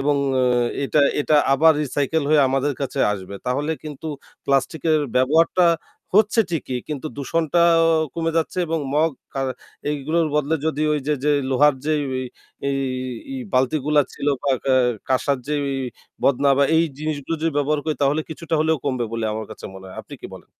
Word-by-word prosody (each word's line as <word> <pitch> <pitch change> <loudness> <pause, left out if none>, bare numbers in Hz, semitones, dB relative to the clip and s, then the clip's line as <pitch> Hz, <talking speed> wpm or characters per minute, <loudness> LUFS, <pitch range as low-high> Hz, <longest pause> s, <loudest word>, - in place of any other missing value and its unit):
এবং 145 +1 +2 0.3
অ - - +2 0.4
এটা 150 - +2 0.2
এটা 150 +1 +3 0.2
আবার 160 +3 +6
recycle 145 +2 -1
হয়ে 155 -1 +5
আমাদের 135 +2 0
কাছে 135 - -3
আসবে। 100 0 -7
তাহলে 145 +5 0
কিন্তু 155 +1 -7 0.4
প্লাস্টিকের 150 +3 +1 0.2
ব্যবহারটা 160 +7 +4 0.5
হচ্ছে 220 +2 +4
ঠিকই। 135 -6 -2
কিন্তু 150 0 -4
দূষণটা 160 +4 0 0.2
আ - - +4 0.3
কমে 165 -1 -1
যাচ্ছে 165 +3 -1
এবং 165 0 -1 0.2
মগ 160 +2 +3 0.3
আ - - +1 0.5
এগুলোর 155 +3 0
বদলে 150 +1 +1
যদি 155 -1 -1
ওইযে 150 0 0
যে 150 - +3 0.2
লোহার 145 +2 +4
যে 155 - +1
ইয়ে 130 -1 -3 0.5
এ - - +1 0.6
এই 260 - -4
বালতিগুলা 145 +3 +2
ছিল 140 - -6 0.2
বা 140 - +1
কা 135 -1 +3 0.3
কাসার 130 +1 +1
এই - - -22
যে 150 - 0 0.7
বদনা 140 +1 +3
বা 140 - +5
এই 165 - +4
জিনিসগুলো 155 0 -3
যদি 165 -1 0
ব্যবহার 145 +1 +1
করি 155 - 0
তাহলে 145 +3 +2
কিছুটা 160 +1 -4
হলেও 160 0 +2
কমবে 130 -4 0
বলে 115 -1 -2
আমার 110 -1 -4
কাছে - - -10
মনে 95 0 -11
হয়। 95 - -11
আপনি - - -11
কি - - -5
বলেন? - - -13
150 Hz, 175 wpm, -22 LUFS, 135-160 Hz, 0.7 s, আবার